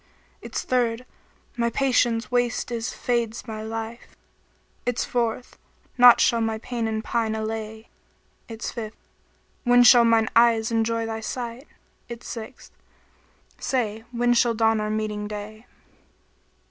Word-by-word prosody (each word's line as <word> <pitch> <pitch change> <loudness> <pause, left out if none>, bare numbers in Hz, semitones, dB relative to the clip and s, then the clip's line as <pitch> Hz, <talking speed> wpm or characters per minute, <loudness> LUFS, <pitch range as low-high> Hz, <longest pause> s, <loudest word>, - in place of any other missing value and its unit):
Its - - -5
third, 245 -1 0 0.5
'My 235 -1 0
patience 240 -3 +1
waste 245 0 0
is, 230 0 -3
fades 235 -2 -2
my 220 -2 -6
life!' 225 +1 -7 0.4
* - - -39
Its 245 -1 0
fourth, 240 0 -2 0.4
'Naught 245 -1 +8
shall 235 -2 +3
my 225 -1 -1
pain 235 0 -3
and 220 0 -2
pine 225 -1 -1
allay!' 220 0 -5 0.6
Its 225 -1 -6
fifth, 220 -2 -6 0.7
'When 245 0 +5
shall 240 0 +8
mine 225 -1 +3
eyes 230 -1 +4
enjoy 230 0 0
thy 225 0 -4
sight?' 240 +4 -6 0.3
* - - -40
Its 235 0 -8
sixth, 230 +2 -8 0.9
'Say, 225 -4 -2
when 240 0 +2
shall 235 -1 +2
dawn 225 -1 +2
our 215 - -2
meeting 215 -1 -2
day?' 210 +2 -8
230 Hz, 135 wpm, -24 LUFS, 220-240 Hz, 0.9 s, Naught